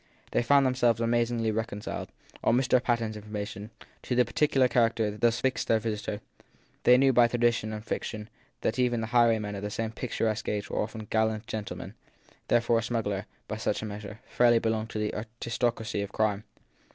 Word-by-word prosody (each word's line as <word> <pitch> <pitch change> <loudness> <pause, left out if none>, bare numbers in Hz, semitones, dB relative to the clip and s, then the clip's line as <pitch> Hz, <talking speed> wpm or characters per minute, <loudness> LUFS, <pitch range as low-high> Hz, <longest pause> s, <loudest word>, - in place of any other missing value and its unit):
They - - +2
found 140 +3 +4
them 130 - +2
selves 120 -3 +2
amazingly 115 -1 +1
reconciled, 110 -1 -4 0.3
on 120 - +4
Mr. 130 -1 +3
Patten 120 -3 0
s - - -9
information, 105 0 -6 0.3
to 125 - -2
the 125 0 +4
particular 135 +1 +2
character 115 -3 +1
thus 120 +2 +2
fixed 130 0 -1
on - - +5
their - - +2
visitor; 105 -1 -3 0.6
they 125 - +8
knew 135 0 +4
by 120 -1 +6
tradition 120 -2 +1
and 110 0 -6
fiction 105 -2 -4 0.3
that 115 - -1
even 120 -2 +2
the - - -1
highwaymen 115 -4 +3
of 100 - -5
the 105 - -3
same 110 +1 -3
picturesque 110 -3 -2
age 105 -1 -3
were - - 0
often 110 0 -5
gallant 110 0 +1
gentlemen; 110 -2 -6 0.5
therefore 120 -1 +3
a - - -2
smuggler, 110 -4 -2 0.2
by 110 - -4
such 110 -1 -1
a - - -2
measure, 105 0 -7
fairly 120 -1 +4
belonged 110 -1 -1
to - - -5
the 105 0 -1
aristoc 115 +2 -2
racy 110 -2 -3
of 100 -1 -5
crime. 105 -1 0
115 Hz, 190 wpm, -28 LUFS, 105-120 Hz, 0.6 s, they